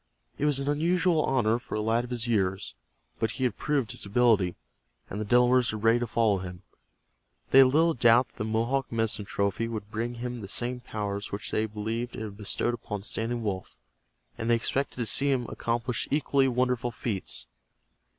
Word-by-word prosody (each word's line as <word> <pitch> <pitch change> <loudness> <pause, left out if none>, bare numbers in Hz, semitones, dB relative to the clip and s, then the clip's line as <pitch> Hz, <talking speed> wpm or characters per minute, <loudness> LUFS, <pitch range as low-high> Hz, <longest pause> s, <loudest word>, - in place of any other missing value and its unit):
It 145 - +1
was 145 -2 +3
an 140 0 -2
unusual 165 +3 +2
honor 120 -3 +2
for 120 - -7
a - - -1
lad 115 +2 +1
of 120 - -8
his 120 -1 -3
years, 95 -4 0 0.5
but 110 - +1
he 130 - -4
had 120 -5 +1
proved 140 -7 -1
his - - -5
ability, 100 -4 +3 0.6
and 105 - -3
the - - -2
Delawares 125 +2 +4
were 110 - -4
ready 115 +2 +3
to 120 - -2
follow 110 -3 +2
him. 90 0 -8 0.9
They 135 - +8
had 135 - +9
little 160 +5 +3
doubt 120 0 +4
that - - -30
the 105 - -2
Mohawk 115 +5 0
medicine 115 -2 -1
trophy 100 +3 -1
would 110 -2 -6
bring 115 +2 -3
him 120 0 -5
the 100 - -7
same 125 +4 -2
powers 105 -4 -4
which 100 - -5
they 110 +1 0
believed 110 +3 -4
it - - -5
had 105 -2 -7
bestowed 105 +3 -1
upon 105 -4 -5
Standing 115 +2 -2
Wolf, 95 -3 -4 0.6
and 115 - -2
they 120 - +5
expected 135 +4 -1
to 120 - -1
see 140 +6 +4
him 130 -3 +1
accomplish 120 +1 -2
equally 140 -2 +2
wonderful 125 -1 0
feats. 110 -4 -3
115 Hz, 195 wpm, -28 LUFS, 105-125 Hz, 0.9 s, had